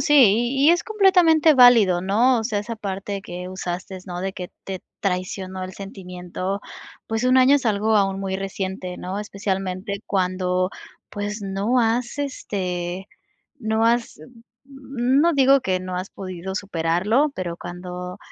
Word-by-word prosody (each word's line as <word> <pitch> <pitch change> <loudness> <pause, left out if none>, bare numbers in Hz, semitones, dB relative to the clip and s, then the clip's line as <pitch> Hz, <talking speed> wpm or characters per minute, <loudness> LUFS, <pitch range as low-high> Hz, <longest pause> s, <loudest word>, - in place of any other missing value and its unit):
sí, 295 - +2
y 250 +3 +5
y - - +9
es 345 - +3
completamente 360 -7 +4
válido, 230 -8 +6
¿no? 230 +7 +3
O - - -5
sea, 215 -3 -1
esa 220 +3 -4
parte 200 -1 -4
que 180 -1 -7
usaste, 185 0 -5
¿no? 175 0 -5
De 190 0 -3
que, 180 -2 -7
te 190 -2 -5 0.2
traicionó 185 0 -3
el 185 - -6
sentimiento, 185 0 -5 0.5
pues, 225 0 -2
1 255 +1 +4
año 260 +2 +6
es 265 -4 +1
algo 215 +1 +2
aún 195 -1 +1
muy 190 -1 -2
reciente, 190 -1 -4
¿no? 190 +3 -4
Especialmente 195 -1 -3
cuando, 185 -1 0 0.4
pues, 205 +1 -4
no 200 +5 0
has, 235 +3 0
este, 185 -9 -3 0.5
no 220 0 +1
has, 235 0 +1 0.5
mm, 270 -1 -1
no 340 +1 +4
digo 275 0 +5
que 185 -4 0
no 185 0 -5
has 185 +2 -4
podido 185 0 -6
superarlo, 195 - +1
pero 175 -2 -4
cuando 180 +1 -7
195 Hz, 155 wpm, -23 LUFS, 185-240 Hz, 0.5 s, y